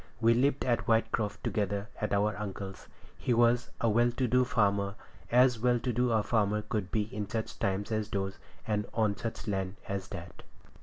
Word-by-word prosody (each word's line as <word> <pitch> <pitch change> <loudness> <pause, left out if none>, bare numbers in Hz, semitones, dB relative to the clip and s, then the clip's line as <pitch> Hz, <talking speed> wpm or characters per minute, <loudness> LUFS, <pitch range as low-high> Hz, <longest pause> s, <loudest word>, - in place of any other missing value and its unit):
We 115 0 +5
lived 135 +3 +2
at 115 -4 +1
Whitecroft 110 -2 +1
together 100 0 -1
at 105 - -2
our 100 +1 +2
uncle's. 100 -1 -6 0.3
He 120 - +1
was 120 +1 +3
a 115 - +1
well 120 +2 +4
to 130 0 0
do 125 +2 +4
farmer, 100 -4 +1 0.4
as 125 -1 +5
well 120 +1 +3
to 125 0 -2
do 125 +1 +2
as 110 -1 +3
a 105 - -9
farmer 105 -2 +2
could 105 -3 -2
be 105 +1 +1
in 105 -3 -3
such 110 0 -4
times 100 +3 -1
as 110 -1 -1
those, 95 -1 -3 0.3
and 105 -3 -1
on 110 -3 +2
such 115 +3 -5
land 95 -1 -2
as 100 -1 -3
that. - - -8
110 Hz, 195 wpm, -30 LUFS, 100-120 Hz, 0.4 s, We